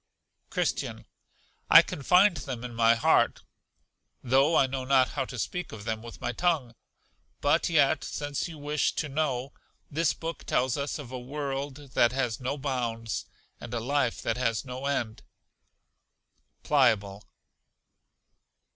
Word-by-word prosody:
Christian. - - -2 0.6
I - - +10
can - - -6
find 180 +6 +5
them 125 -3 -5
in 125 -1 -6
my 115 0 +4
heart, 115 - +2 0.8
though 135 +6 +3
I 135 - +5
know 130 0 -4
not 130 -1 +3
how - - -2
to 125 - -8
speak 180 - -3
of 110 -2 -9
them 110 0 -3
with 115 0 -10
my - - -2
tongue; 160 -9 0 0.7
but 145 +5 +2
yet, 145 -2 +3
since 145 +1 -3
you 165 -2 -9
wish 145 0 0
to 155 - -2
know, 135 -3 -2 0.4
this 160 +1 +1
book 165 -1 -6
tells 125 -1 +1
us 140 0 -3
of 140 -5 -9
a 130 - -5
world 140 +1 -5
that 120 +1 +4
hast 125 -4 -1
no 130 +3 -2
bounds, 120 -5 -3 0.3
and 120 0 -6
a - - 0
life 130 0 0
that - - -1
has 115 -1 0
no 130 +2 -5
end. 115 -6 -2 1.4
Pliable. 100 -1 +2
135 Hz, 145 wpm, -28 LUFS, 120-145 Hz, 1.4 s, I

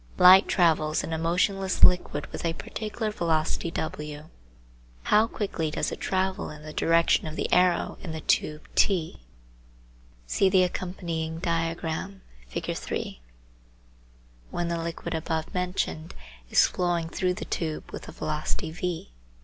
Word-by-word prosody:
Light 185 +2 +9
travels 155 -4 +2
in 165 - -4
a 160 - -1
motionless 185 +3 +1
liquid 180 0 +4
with - - -6
a 165 -1 0
particular 215 +4 -4
velocity 165 -3 0
w. 150 -1 -5 0.7
How 215 +2 +4
quickly 195 -8 -2
does - - -1
it - - -6
travel 190 +1 0
in 150 0 -10
the 155 0 -8
direction 165 -1 +3
of 155 - -5
the - - -1
arrow 180 -1 +3
in 175 - -6
the 160 0 -5
tube 150 +1 0
T 175 - +2 1.1
(see 190 - +2
the 185 -1 +5
accompanying 170 -3 -3
diagram, 165 +2 -2 0.2
Fig. - - -3
3) - - -4 1.3
when 175 -1 -2
the 170 -1 -1
liquid 170 +1 -4
above 160 0 -2
mentioned 180 -3 -2 0.3
is - - +6
flowing 175 -2 0
through 180 +2 -1
the - - -6
tube 160 -2 -3
with - - -8
a - - -7
velocity 155 +1 -3
v 175 - -4
170 Hz, 140 wpm, -27 LUFS, 160-185 Hz, 1.3 s, Light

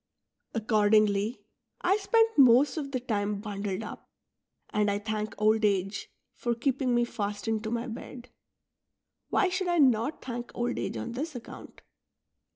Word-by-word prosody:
Accordingly, 215 0 +2 0.4
I 380 +3 +3
spend 450 +2 +4
most 260 +1 +6
of 295 -4 -3
the 255 - -1
time 210 -4 -2
bundled 200 -1 -4
up; - - -9 0.6
and 210 -1 +2
I 200 - +1
thank 215 0 -3
old 215 +1 +3
age 195 -1 0 0.2
for 240 -1 -2
keeping 255 0 0
me 240 0 +3
fastened 215 0 -3
to - - -2
my 235 +1 -2
bed." 245 +1 -8 1.0
Why 385 - +3
should 370 0 -1
I 350 0 +1
not 260 -1 +3
thank 240 -1 -5
old 245 0 -1
age - - -3
on - - -4
this 290 +5 -4
account 240 - -10
230 Hz, 150 wpm, -28 LUFS, 210-255 Hz, 1.0 s, most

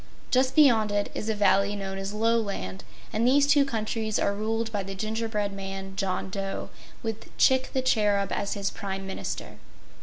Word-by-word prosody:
Just 260 +1 +3
beyond 235 -9 +5
it 205 0 0
is 215 - -3
a 220 - +1
valley 205 0 +3
known 195 -1 -4
as 195 +1 -4
Loland, 210 - -1 0.3
and 225 +3 +2
these 280 +2 +5
two 285 0 +5
countries 220 -3 -1
are 200 - +1
ruled 225 +2 -1
by 205 -2 -1
the 195 0 -6
Gingerbread 215 0 -2
Man, 195 0 -6
John 190 -1 -2
Dough, 195 0 -4 0.3
with 225 -1 -4
Chick 260 0 +4
the 260 - 0
Cherub 205 -5 +2
as 200 - -1
his 200 -1 -1
Prime 195 -1 -5
Minister. 190 - -5
210 Hz, 175 wpm, -27 LUFS, 195-225 Hz, 0.3 s, beyond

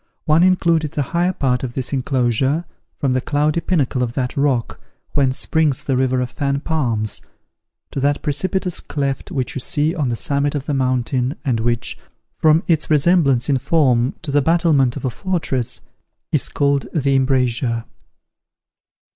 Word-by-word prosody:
One 155 +2 +4
included 170 -4 +2
the 145 - 0
higher 175 +2 +2
part 130 -8 0
of 120 -2 -5
this 130 +1 -3
enclosure, 130 +4 0 0.3
from 135 -4 0
the 130 - +1
cloudy 150 +4 0
pinnacle 140 -9 0
of 120 -2 -1
that 125 +1 -2
rock, 140 -5 0 0.3
whence 135 -2 +1
springs 150 -3 +1
the 135 -3 0
river 130 0 +1
of 125 -1 -3
Fan 140 +1 -1
Palms, 115 -10 -1 0.7
to - - -3
that 145 +1 0
precipitous 180 +4 -1
cleft 140 -2 -3
which 135 -9 -2
you - - -3
see 150 +5 0
on 150 -8 -1
the 120 - -1
summit 140 +4 -1
of 140 -2 -3
the 145 - -2
mountain, 130 0 0
and 125 -5 +1
which, 120 +1 -1 0.4
from 155 +1 +3
its 160 -3 +1
resemblance 150 -5 +3
in 140 -3 +2
form 130 -4 +2
to 150 - -4
the 145 +1 +3
battlement 155 -5 +2
of - - -5
a 130 - 0
fortress, 160 - -2 0.5
is - - 0
called 140 -1 +1
the 140 -3 +2
Embrasure. 125 -3 +1
140 Hz, 165 wpm, -20 LUFS, 125-155 Hz, 0.7 s, One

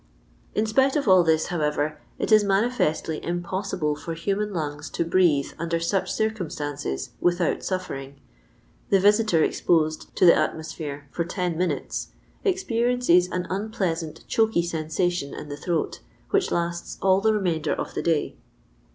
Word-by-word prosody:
" - - -33
In 215 - +2
spite 265 +5 +3
of 285 -5 0
all 185 -2 +7
this, 160 -1 +2
however, 150 -1 -1 0.2
it - - -2
is 215 -1 +7
manifestly 195 -7 0
impossible 175 -3 -2
for 165 +2 -6
human 200 +5 -1
lungs 150 -4 -4
to 170 - -1
breathe 165 -5 +2
under 165 0 -1
such 180 +3 0
circumstances 150 - -3
without 175 -1 +1
sirring. 140 -8 -4 0.7
The 195 - +5
visitor 205 -4 +4
ex - - -1
posed 155 -2 +1
to - - +4
the 170 - +9
atmosphere 155 -3 -3
for 170 - -1
ten 175 0 -2
minutes 180 +2 -2 0.4
expe 370 - 0
riences 240 -8 +3
an 180 -1 -2
unpleasant 190 -6 -3
choky 220 -6 +2
sensation 170 -1 -1
in 150 - -8
the 145 - -4
throat, 170 +1 -2 0.3
which 400 -2 +2
lasts 170 0 -2
all 190 0 +4
the 220 +1 +3
remainder 180 -7 0
of - - -5
the - - -2
day. 165 -3 0
175 Hz, 150 wpm, -25 LUFS, 155-200 Hz, 0.7 s, the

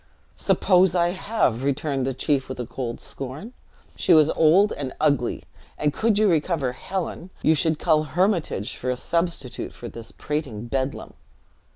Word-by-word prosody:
"Suppose 185 -2 +3
I 175 -1 +3
have!" 185 - 0
returned 140 -1 -1
the 135 - -1
chief 140 -1 0
with 130 - -6
a 125 - -2
cold 120 0 -5
scorn; 140 - -8 0.4
"she - - +4
was 155 -1 +5
old 180 +7 +4
and 135 -3 -5
ugly; 140 -6 +1 0.3
and 150 -1 0
could 220 +3 +1
you 215 0 +4
recover 160 -6 +1
Helen, 185 +4 -5
you 160 - +5
should 160 +1 +2
cull 155 -2 +2
Hermitage, 170 - 0
for 125 - -4
a 125 - 0
substitute 170 -5 -2
for 120 - -8
this 115 0 -9
prating 140 -8 -4
bedlam." 130 +2 -3
150 Hz, 160 wpm, -24 LUFS, 130-175 Hz, 0.4 s, was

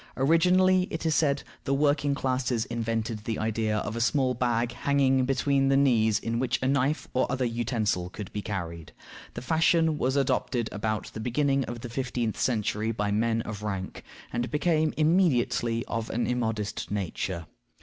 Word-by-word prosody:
Originally, 180 +6 +4
it 160 - -5
is 160 - +2
said, 140 -3 +2 0.2
the 140 0 0
working 145 0 +2
classes 130 -4 -1
invented 115 -1 -2
the 115 -1 -2
idea 110 -1 0
of 105 +1 -3
a 115 - -2
small 130 +1 +2
bag 120 -1 0
hanging 135 0 +2
between 135 +1 +1
the 135 0 +4
knees 115 -6 +3
in 115 +1 -2
which 130 -1 0
a - - +2
knife 140 +2 +1
or 130 - +1
other 130 -1 0
utensil 115 -6 -1
could 100 0 -8
be 105 - -3
carried. 85 -6 -5 0.4
The - - -6
fashion 160 +1 +2
was 130 +2 +1
adopted 125 -3 0
about 110 +1 -3
the - - -6
beginning 135 +3 +1
of 120 0 -6
the 120 - -6
fifteenth 120 -3 -2
century 110 -2 0
by 105 -2 -1
men 115 +2 +1
of 105 -1 -6
rank, 95 -3 -4 0.3
and 120 +1 -1
became 155 0 +1
immediately 150 -8 +2
of 115 -1 -3
an 120 - -1
immodest 110 -4 -2
nature. 95 -3 -3
120 Hz, 170 wpm, -27 LUFS, 110-140 Hz, 0.4 s, Originally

